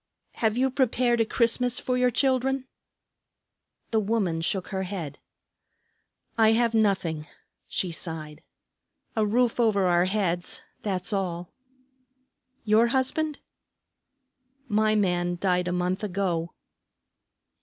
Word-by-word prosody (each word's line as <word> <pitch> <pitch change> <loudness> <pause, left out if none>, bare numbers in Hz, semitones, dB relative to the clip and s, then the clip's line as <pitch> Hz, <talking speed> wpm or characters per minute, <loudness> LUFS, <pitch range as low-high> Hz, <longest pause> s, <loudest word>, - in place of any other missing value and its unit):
"Have 220 0 0
you 265 +1 +2
prepared 245 -2 +2
a - - +3
Christmas 240 +2 +2
for 255 - -1
your 250 0 +3
children?" 265 +1 +1 1.3
The 220 - +3
woman 200 -6 0
shook 185 +2 -2
her 190 -2 -2
head. 180 -7 -5 1.2
"I 220 0 +6
have 230 0 +2
nothing," 185 -8 +1 0.4
she 180 - -2
sighed. 160 -2 -4 0.7
"A 220 - +2
roof 240 +3 +1
over 210 -5 +3
our 175 0 +3
heads, 185 -3 -1 0.2
that's 195 0 -2
all." 180 -3 -3 1.1
"Your 220 +1 +4
husband?" 275 +4 0 1.3
"My 215 0 +2
man 175 -3 +1
died 180 -1 +1
a - - 0
month 180 +2 -1
ago." 180 -4 -1
205 Hz, 110 wpm, -26 LUFS, 180-235 Hz, 1.3 s, I